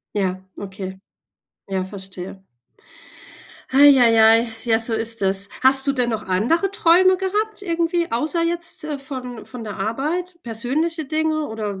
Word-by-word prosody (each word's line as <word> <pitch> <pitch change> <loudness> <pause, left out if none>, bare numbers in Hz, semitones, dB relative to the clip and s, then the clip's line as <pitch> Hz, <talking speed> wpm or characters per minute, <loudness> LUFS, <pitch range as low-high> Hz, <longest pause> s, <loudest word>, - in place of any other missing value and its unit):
Ja, 185 -2 -2
okay. 190 -1 -8 0.7
Ja, 190 -1 -1
verstehe. 190 -1 -9 1.3
Ei 280 0 +6
ei 230 -2 +4
ei, 225 +1 +5 0.2
ja, 225 -2 +2
so 225 0 +2
ist 225 0 +1
das. 195 +1 +2
Hast 265 +1 +7
du 275 - +2
denn 250 -3 0
noch 215 -2 -4
andere 240 - +1
Träume 370 0 +4
gehabt, 415 +3 -3
irgendwie, 335 -1 -1
außer 305 +8 -1
jetzt, 335 -1 -2
äh, 300 -2 -4
von 255 -3 -8
von 250 -3 -9
der 210 - -7
Arbeit, 305 - -3
persönliche 285 +9 -3
Dinge 310 +1 -1
oder 210 -3 -5
250 Hz, 145 wpm, -21 LUFS, 215-330 Hz, 1.3 s, Hast